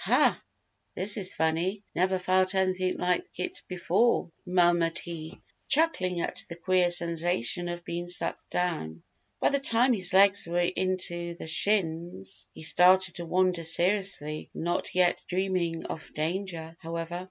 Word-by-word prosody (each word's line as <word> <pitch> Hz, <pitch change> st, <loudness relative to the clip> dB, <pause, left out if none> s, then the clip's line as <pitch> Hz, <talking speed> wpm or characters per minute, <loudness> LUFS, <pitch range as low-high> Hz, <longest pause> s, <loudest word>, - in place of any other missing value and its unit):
"Huh! -, -, +4 dB, 0.6 s
This 200 Hz, +3 st, +3 dB
is 190 Hz, -4 st, -1 dB
funny. 170 Hz, +6 st, -1 dB
Never 185 Hz, +1 st, +1 dB
felt 185 Hz, +1 st, +1 dB
anything 185 Hz, -1 st, 0 dB
like 180 Hz, 0 st, 0 dB
it 180 Hz, -, -4 dB
before," 180 Hz, +2 st, +1 dB, 0.2 s
murmured 175 Hz, -2 st, +2 dB
he, 165 Hz, 0 st, -7 dB, 0.3 s
chuckling 185 Hz, -, +1 dB
at -, -, -2 dB
the 170 Hz, -, -7 dB
queer 180 Hz, +1 st, +1 dB
sensation 175 Hz, -1 st, +1 dB
of 175 Hz, 0 st, -6 dB
being 175 Hz, +1 st, -5 dB
sucked 180 Hz, -, -3 dB
down. 160 Hz, -, -3 dB, 0.4 s
By -, -, +3 dB
the 280 Hz, -, 0 dB
time 250 Hz, -1 st, +2 dB
his 185 Hz, -5 st, +3 dB
legs 195 Hz, 0 st, +5 dB
were 170 Hz, +1 st, -2 dB
in 185 Hz, +1 st, 0 dB
to 175 Hz, -1 st, -1 dB
the -, -, -9 dB
shins, 165 Hz, -, -1 dB
he -, -, -11 dB
started 180 Hz, +2 st, +4 dB
to 170 Hz, -1 st, -6 dB
wonder 180 Hz, 0 st, +1 dB
seriously, 170 Hz, -2 st, +1 dB
not 175 Hz, +2 st, -3 dB
yet 180 Hz, -1 st, +2 dB
dreaming 180 Hz, -3 st, -2 dB
of 160 Hz, -, -7 dB
danger, 165 Hz, 0 st, -4 dB
however. 165 Hz, +1 st, -5 dB
175 Hz, 145 wpm, -27 LUFS, 170-185 Hz, 0.6 s, legs